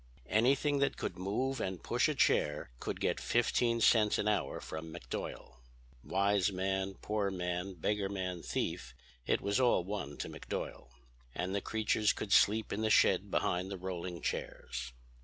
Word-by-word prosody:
"Anything 140 +6 +3
that 140 - +1
could - - -3
move 115 +9 -1
and 95 -2 -3
push - - +2
a - - -1
chair 75 -4 +2
could - - -4
get - - 0
fifteen 120 0 +2
cents 110 -2 +5
an 105 - 0
hour 105 -1 0
from 80 +1 -7
McDuyal. - - -6 0.5
Wise 100 0 +2
man, 95 +1 -1
poor 105 -2 0
man, 90 0 -3
beggar 100 +4 -1
man, 90 -3 -3
thief, 60 -4 -3 0.3
it - - +2
was 100 +5 +1
all 120 -8 +4
one 90 -7 -5
to - - -4
McDuyal. - - -6 0.5
And 90 +2 -2
the 100 - 0
creatures 110 0 +1
could 100 - -2
sleep 110 +1 +4
in 105 - -2
the 110 - +1
shed - - +4
behind 90 +2 0
the 100 - -4
rolling 90 -1 -5
chairs. 60 0 -4
100 Hz, 160 wpm, -33 LUFS, 90-110 Hz, 0.5 s, cents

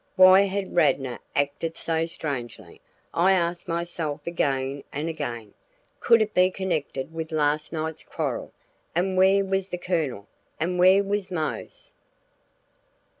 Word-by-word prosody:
Why 185 0 +8
had 195 0 -3
Radnor 135 -7 +2 0.2
acted 145 +3 -1
so 165 0 -1
strangely, 120 - -6 0.3
I 185 +3 +4
asked 175 -1 -1
myself 165 -3 -3
again 140 -4 -1
and 150 +3 -3
again. 120 -9 -5 0.5
Could 230 -2 +5
it 210 0 -7
be 180 0 +5
connected 165 -6 -3
with 160 0 -5
last 150 -1 0
night's 160 -1 -4
quarrel? - - -4 0.4
And 185 +2 +1
where 190 +1 +4
was 195 0 -1
the 180 - -3
Colonel, 160 - -2 0.3
and 180 +3 -1
where 190 +2 +6
was 200 -1 -2
Mose? 180 - -5
165 Hz, 130 wpm, -25 LUFS, 145-185 Hz, 0.5 s, Why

